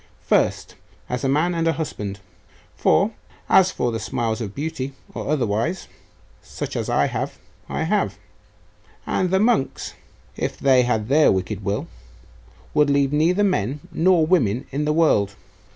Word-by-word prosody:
First, -, -, +1 dB, 0.4 s
as 125 Hz, +2 st, -3 dB
a 135 Hz, -, +1 dB
man 155 Hz, +6 st, +2 dB
and 165 Hz, -1 st, 0 dB
a 165 Hz, -, +3 dB
husband;.... 105 Hz, -10 st, -5 dB, 0.6 s
for -, -, +3 dB, 0.4 s
as 190 Hz, -1 st, +5 dB
for 125 Hz, -9 st, -1 dB
the 115 Hz, -, -3 dB
smiles 115 Hz, -3 st, -2 dB
of 100 Hz, -3 st, -5 dB
beauty, 140 Hz, -2 st, -4 dB, 0.2 s
or -, -, -5 dB
otherwise, 135 Hz, -, 0 dB, 0.5 s
such -, -, -6 dB
as -, -, -2 dB
I -, -, +3 dB
have, -, -, -3 dB, 0.3 s
I -, -, -2 dB
have; -, -, 0 dB, 0.9 s
and 185 Hz, -, 0 dB
the 190 Hz, +1 st, +2 dB
monks, 215 Hz, -, +1 dB, 0.4 s
if -, -, -3 dB
they 130 Hz, -2 st, +4 dB
had 110 Hz, -4 st, 0 dB
their 150 Hz, +4 st, +5 dB
wicked 95 Hz, +2 st, -2 dB
will, 100 Hz, +2 st, -1 dB, 0.9 s
would 150 Hz, -1 st, +3 dB
leave 140 Hz, 0 st, +2 dB
neither 170 Hz, +7 st, +3 dB
men 140 Hz, -, 0 dB
nor 170 Hz, -1 st, +3 dB
women 130 Hz, -, +2 dB
in 145 Hz, +2 st, -1 dB
the 150 Hz, -, +1 dB
world. 105 Hz, -11 st, +2 dB
140 Hz, 150 wpm, -22 LUFS, 115-165 Hz, 0.9 s, as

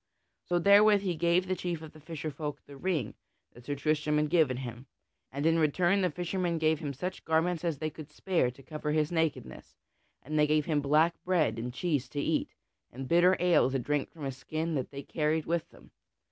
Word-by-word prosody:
So 175 Hz, -, +1 dB
therewith 200 Hz, +3 st, +6 dB
he 190 Hz, -3 st, -1 dB
gave 170 Hz, +3 st, +2 dB
the 185 Hz, 0 st, -1 dB
chief 170 Hz, -2 st, -4 dB
of 155 Hz, -, -10 dB
the 155 Hz, -, -14 dB
fisher 155 Hz, 0 st, -6 dB
folk 145 Hz, +1 st, -6 dB
the 140 Hz, -, -12 dB
ring 150 Hz, -, -2 dB, 0.4 s
that 120 Hz, 0 st, -15 dB
Sir 145 Hz, -, -2 dB
Tristram 150 Hz, +1 st, 0 dB
had 150 Hz, 0 st, 0 dB
given 155 Hz, -8 st, +3 dB
him, 125 Hz, 0 st, -7 dB, 0.4 s
and 140 Hz, +3 st, -3 dB
in 165 Hz, 0 st, +4 dB
return 175 Hz, +5 st, +2 dB
the 180 Hz, -, +2 dB
fishermen 175 Hz, +1 st, -2 dB
gave 160 Hz, -1 st, +2 dB
him 150 Hz, -4 st, -4 dB
such 180 Hz, +8 st, -5 dB
garments 160 Hz, +1 st, +1 dB
as 165 Hz, -4 st, -1 dB
they 155 Hz, +2 st, -3 dB
could 155 Hz, -1 st, -10 dB
spare 165 Hz, -3 st, 0 dB
to 125 Hz, +2 st, -13 dB
cover 150 Hz, 0 st, -4 dB
his 155 Hz, 0 st, +1 dB
nakedness; 160 Hz, -, -2 dB, 0.5 s
and 155 Hz, +2 st, -2 dB
they 150 Hz, -, +4 dB
gave 150 Hz, 0 st, +2 dB
him 150 Hz, -3 st, +1 dB
black 155 Hz, +4 st, +2 dB
bread 175 Hz, -10 st, +1 dB
and 120 Hz, +2 st, -4 dB
cheese 140 Hz, -2 st, -1 dB
to 145 Hz, -, -4 dB
eat, -, -, -1 dB, 0.4 s
and 130 Hz, +2 st, -7 dB
bitter 175 Hz, +4 st, +4 dB
ale 175 Hz, -7 st, +4 dB
to 135 Hz, -, -1 dB
drink 145 Hz, +2 st, -1 dB
from 155 Hz, -4 st, -9 dB
a 135 Hz, -, -2 dB
skin 155 Hz, +5 st, -4 dB
that 135 Hz, -4 st, -2 dB
they 140 Hz, 0 st, -8 dB
carried 155 Hz, +1 st, -1 dB
with 170 Hz, 0 st, -1 dB
them. -, -, -19 dB
155 Hz, 215 wpm, -30 LUFS, 145-170 Hz, 0.5 s, therewith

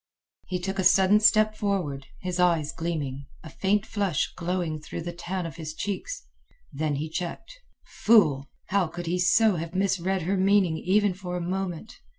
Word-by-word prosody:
He 185 Hz, -, -2 dB
took 195 Hz, +2 st, -4 dB
a -, -, +2 dB
sudden 190 Hz, +3 st, +5 dB
step 215 Hz, 0 st, +4 dB
forward, 180 Hz, -10 st, -2 dB
his 180 Hz, -1 st, -3 dB
eyes 165 Hz, -4 st, +2 dB
gleaming, 145 Hz, -5 st, -4 dB, 0.2 s
a 160 Hz, -, -10 dB
faint 205 Hz, +2 st, 0 dB
flush 200 Hz, -8 st, -1 dB
glowing 175 Hz, -3 st, -2 dB
through 155 Hz, -, -6 dB
the 175 Hz, +1 st, -5 dB
tan 175 Hz, +1 st, -4 dB
of 165 Hz, 0 st, -7 dB
his 155 Hz, -1 st, -6 dB
cheeks. 205 Hz, -, -4 dB, 0.5 s
Then 150 Hz, +1 st, -1 dB
he 150 Hz, +3 st, -3 dB
checked. 180 Hz, -, -6 dB, 0.3 s
Fool! 150 Hz, -12 st, +3 dB, 0.2 s
How 195 Hz, -3 st, +2 dB
could 175 Hz, +2 st, -7 dB
he 175 Hz, +2 st, -1 dB
so 210 Hz, +2 st, +4 dB
have 165 Hz, +2 st, -6 dB
misread 190 Hz, -1 st, 0 dB
her 190 Hz, +4 st, 0 dB
meaning 190 Hz, -3 st, +3 dB
even 205 Hz, +1 st, +2 dB
for 180 Hz, -1 st, -5 dB
a 175 Hz, -1 st, -4 dB
moment? 190 Hz, +1 st, -4 dB
180 Hz, 170 wpm, -26 LUFS, 165-195 Hz, 0.5 s, sudden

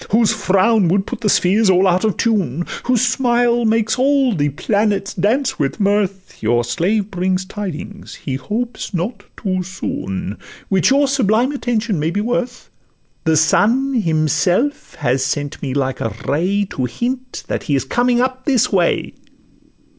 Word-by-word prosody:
Whose 225 Hz, +1 st, +3 dB
frown 205 Hz, 0 st, +2 dB
would 190 Hz, +3 st, +1 dB
put -, -, -6 dB
the 210 Hz, -, +1 dB
spheres 200 Hz, +3 st, +3 dB
all 185 Hz, +1 st, +4 dB
out 180 Hz, 0 st, +2 dB
of 215 Hz, -3 st, 0 dB
tune, 180 Hz, -, 0 dB, 0.2 s
Whose 250 Hz, -2 st, +2 dB
smile 240 Hz, -2 st, +2 dB
makes 225 Hz, +1 st, +1 dB
all 270 Hz, -2 st, +3 dB
the 145 Hz, -5 st, 0 dB
planets 200 Hz, +6 st, 0 dB
dance 225 Hz, +8 st, 0 dB
with 140 Hz, +8 st, -1 dB
mirth, 200 Hz, -2 st, -1 dB
Your 120 Hz, +2 st, +2 dB
slave 195 Hz, -, -1 dB
brings 185 Hz, 0 st, -1 dB
tidings—he 195 Hz, -5 st, -6 dB
hopes 220 Hz, -, -4 dB
not 205 Hz, +5 st, -3 dB
too 185 Hz, -2 st, -1 dB
soon— 105 Hz, -, -5 dB, 0.3 s
Which 190 Hz, -2 st, +3 dB
your 280 Hz, +1 st, +3 dB
sublime 250 Hz, -1 st, +2 dB
attention 230 Hz, -, -1 dB
may 155 Hz, +2 st, 0 dB
be 190 Hz, +5 st, -2 dB
worth: 245 Hz, +3 st, -3 dB, 0.5 s
The 160 Hz, -1 st, +3 dB
Sun 235 Hz, -, +3 dB
himself 175 Hz, -, 0 dB
has 130 Hz, +2 st, 0 dB
sent 145 Hz, +2 st, -3 dB
me 135 Hz, -2 st, -3 dB
like 135 Hz, -2 st, -1 dB
a 110 Hz, -2 st, -3 dB
ray, 185 Hz, +8 st, +1 dB
To 130 Hz, -, -2 dB
hint 250 Hz, -, -4 dB
that -, -, -3 dB
he 145 Hz, -, +3 dB
is 135 Hz, -2 st, -1 dB
coming 245 Hz, -, +1 dB
up 260 Hz, 0 st, -2 dB
this 260 Hz, -6 st, +2 dB
way. 175 Hz, -3 st, +1 dB
200 Hz, 155 wpm, -18 LUFS, 170-240 Hz, 0.5 s, all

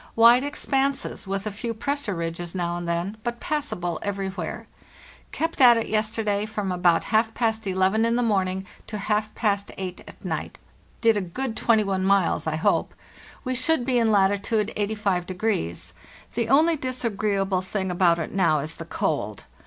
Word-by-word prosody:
Wide 235 Hz, +3 st, +7 dB
expanses, 275 Hz, -5 st, -1 dB
with 195 Hz, +1 st, -2 dB
a 215 Hz, -, -2 dB
few 230 Hz, +3 st, -4 dB
cg -, -, -20 dB
pressure 280 Hz, -6 st, -1 dB
ridges 170 Hz, +1 st, -4 dB
now 175 Hz, -1 st, -1 dB
and 175 Hz, -1 st, -4 dB
then, 175 Hz, +5 st, -2 dB
but 240 Hz, 0 st, -3 dB
passable 275 Hz, -, -2 dB
everywhere. 195 Hz, -1 st, -4 dB, 0.7 s
Kept 325 Hz, -2 st, -2 dB
at 240 Hz, -2 st, +8 dB
it 230 Hz, -, -1 dB
yesterday 215 Hz, -1 st, 0 dB
from 210 Hz, -3 st, -3 dB
about 175 Hz, -2 st, +3 dB
half 220 Hz, +1 st, +3 dB
past 220 Hz, -3 st, 0 dB
eleven 190 Hz, +3 st, +2 dB
in 230 Hz, 0 st, +2 dB
the 245 Hz, -, +1 dB
morning 190 Hz, -3 st, 0 dB, 0.2 s
to 215 Hz, -, -4 dB
half 210 Hz, +1 st, -1 dB
past 200 Hz, -3 st, 0 dB
eight 185 Hz, -2 st, -5 dB
at -, -, -13 dB
might; -, -, -4 dB, 0.4 s
did 225 Hz, -2 st, +4 dB
a -, -, 0 dB
good 225 Hz, +7 st, -4 dB
21 205 Hz, -6 st, +2 dB
miles, 190 Hz, -5 st, +2 dB
I 155 Hz, -, 0 dB
hope. 160 Hz, -, +1 dB, 0.5 s
We 255 Hz, -, -1 dB
should 255 Hz, +1 st, +1 dB
be 250 Hz, -1 st, +2 dB
in 225 Hz, -1 st, +3 dB
latitude 205 Hz, +2 st, +2 dB
85°. 190 Hz, -, -1 dB, 0.4 s
The 230 Hz, -1 st, -1 dB
only 315 Hz, +5 st, +5 dB
disagreeable 210 Hz, -8 st, -1 dB
thing 190 Hz, 0 st, -2 dB
about 175 Hz, -1 st, +3 dB
it 165 Hz, -, -4 dB
now 170 Hz, -5 st, +3 dB
is 150 Hz, +3 st, -4 dB
the -, -, -7 dB
cold. -, -, -2 dB
205 Hz, 170 wpm, -25 LUFS, 185-230 Hz, 0.7 s, at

